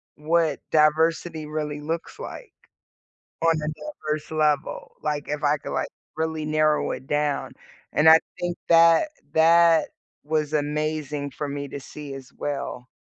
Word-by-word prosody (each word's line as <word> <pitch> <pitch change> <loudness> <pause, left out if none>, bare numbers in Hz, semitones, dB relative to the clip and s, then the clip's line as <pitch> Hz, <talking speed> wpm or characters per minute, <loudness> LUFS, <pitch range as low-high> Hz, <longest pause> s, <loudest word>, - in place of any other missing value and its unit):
what 160 -1 +1
diversity 160 +1 +2
really 150 -1 -3
looks 165 - -4
like, - - -8 0.9
on 165 0 +4
a 150 - -3
diverse 155 - -5
level, 150 -2 0
like, 150 -1 -2
if 150 +1 -3
I 145 +1 +4
could, - - -8
like, - - -1 0.3
really 160 -1 -1
narrow 155 0 +2
it 130 - -6
down," 150 -1 -1 0.4
and 155 +1 +6
I 160 0 +9 0.2
think 175 0 -2
that 165 - +6 0.2
that 165 0 +5 0.4
was 150 -1 0
amazing 150 -1 -1
for 145 - -4
me 140 0 -4
to 140 - -6
see 145 +1 -9
as 135 -2 -11
well 140 -3 -4
155 Hz, 145 wpm, -24 LUFS, 145-160 Hz, 0.9 s, I